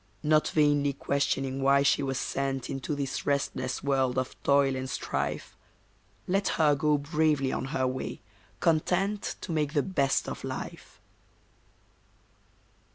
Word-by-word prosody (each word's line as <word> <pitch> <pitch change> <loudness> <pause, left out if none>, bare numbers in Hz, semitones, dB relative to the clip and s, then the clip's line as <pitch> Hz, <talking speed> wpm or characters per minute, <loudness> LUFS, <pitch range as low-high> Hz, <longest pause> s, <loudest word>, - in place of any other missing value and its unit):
Not 155 0 +3
vainly 145 -2 +2
questioning 135 -1 -1
why 140 +1 +4
she 140 - +3
was 135 -2 -2
sent 135 0 -2
Into 135 +2 -3
this 140 -2 -3
restless 130 -2 -1
world 135 -2 +1
of 130 0 -2
toil 140 -1 +3
and 130 0 -4
strife, 125 - -3 0.7
Let 195 +2 +1
her 150 -2 +5
go 150 +1 +2
bravely 145 -2 +1
on - - -2
her 130 -1 -1
way, 130 0 -3 0.4
content 185 +5 +1
To - - -5
make 150 -2 0
the 145 - +2
best 140 -8 +1
of - - -6
life. - - -7
140 Hz, 135 wpm, -28 LUFS, 135-150 Hz, 0.7 s, her